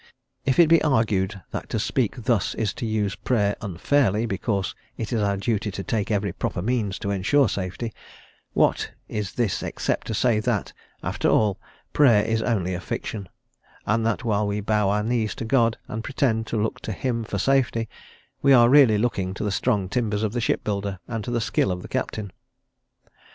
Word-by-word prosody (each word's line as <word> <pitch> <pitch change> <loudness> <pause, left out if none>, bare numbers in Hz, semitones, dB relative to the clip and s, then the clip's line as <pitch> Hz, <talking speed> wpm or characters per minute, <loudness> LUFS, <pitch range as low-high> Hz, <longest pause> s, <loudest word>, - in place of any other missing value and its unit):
If 130 - +2
it 170 - +7
be 165 +1 +5
argued 105 - +1
that - - -5
to - - -1
speak - - -1
thus - - +1
is 110 -3 -1
to 115 - -4
use 105 -2 0
Prayer 105 -5 +1
unfairly, 110 +3 +1
because 100 -2 -1 0.2
it 115 0 -4
is 115 - +1
our 100 -1 +1
duty 105 +1 -1
to 95 0 -5
take 110 +1 -1
every 100 -4 0
proper 90 - -3
means 110 -4 0
to 100 - -3
ensure 115 +8 +3
safety, 100 +3 -4 0.6
what, - - +2
is 105 -3 -4
this 115 -6 0
except - - -2
to 110 - -2
say 115 -1 +2
that, 110 - -1 0.3
after - - 0
all, 105 -1 +2 0.3
Prayer 120 -8 +5
is 115 0 0
only 95 -6 0
a 90 - -4
fiction, 100 0 -5 0.6
and 110 +2 +1
that 115 -1 0
while 105 -2 +1
we 100 +1 -1
bow 105 -1 +1
our 105 +1 +1
knees 110 -1 0
to - - -5
God, 115 -2 +2
and 110 +1 -5
pretend 115 -5 0
to 115 - -2
look 110 +1 -1
to 110 - -5
him 115 +2 -2
for 105 - -4
safety, 120 0 +1 0.5
we 140 0 +5
are 120 -2 +7
really 130 -6 +6
looking 100 -4 -1
to - - -4
the 105 - 0
strong 100 -1 +1
timbers 110 -1 -1
of 110 -1 -1
the 120 - -1
ship - - 0
builder, 100 -2 -2
and 115 -3 -3
to - - -5
the 120 -1 0
skill 105 -3 +1
of 90 0 -4
the - - -8
captain? 105 -3 -3
110 Hz, 195 wpm, -24 LUFS, 100-120 Hz, 0.6 s, it